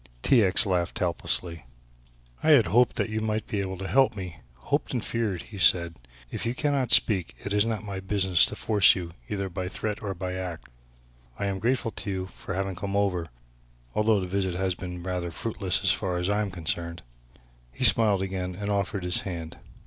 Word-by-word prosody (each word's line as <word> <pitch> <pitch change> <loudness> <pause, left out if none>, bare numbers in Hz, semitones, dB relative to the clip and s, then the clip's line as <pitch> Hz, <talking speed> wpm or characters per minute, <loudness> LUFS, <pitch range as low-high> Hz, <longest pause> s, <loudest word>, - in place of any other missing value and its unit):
T. 120 -5 +5
X. 95 -1 +6
laughed 90 -3 -1
helplessly. 85 -2 0 0.8
"I - - +1
had 140 -8 +7
hoped 120 +3 +3
that 110 - -1
you 110 - -1
might 110 0 -2
be 105 - -3
able 95 -1 -3
to 95 +1 -5
help 135 -1 +3
me, 90 -4 -7 0.2
hoped - - -2
and - - -2
feared," 105 -7 -2
he 105 -3 -10
said; 85 -2 +4 0.4
"if - - -4
you 120 +1 -2
cannot 140 -3 0
speak 95 -6 +3
it 100 - -2
is 105 +2 +3
not 110 -3 -3
my 100 -2 -5
business 95 -2 +3
to - - -7
force 105 -3 +4
you 85 -2 -5 0.2
either 100 -1 -2
by 95 0 -5
threat 105 +2 -4
or 100 -2 -4
by 90 +1 -4
act. 90 -3 -6 0.7
I 100 - -3
am 100 -1 -2
grateful 120 +1 0
to 105 - -5
you 95 -1 -3
for 90 - -6
having 95 0 -2
come 100 +3 -4
over, 95 -4 0 0.7
although 105 -1 +2
the 95 - -3
visit 95 -1 -2
has 95 0 0
been 90 0 -7
rather 90 -1 -3
fruitless 95 0 -3
so - - +3
far 90 -2 -3
as 90 +2 -1
I 105 +1 +1
am 105 - -2
concerned." 85 -1 -1 0.7
He - - -5
smiled 105 -4 +5
again 90 -1 -4
and 100 +2 -4
offered 100 -1 -1
his 90 0 +3
hand. 85 -4 -7
95 Hz, 200 wpm, -26 LUFS, 90-105 Hz, 0.8 s, had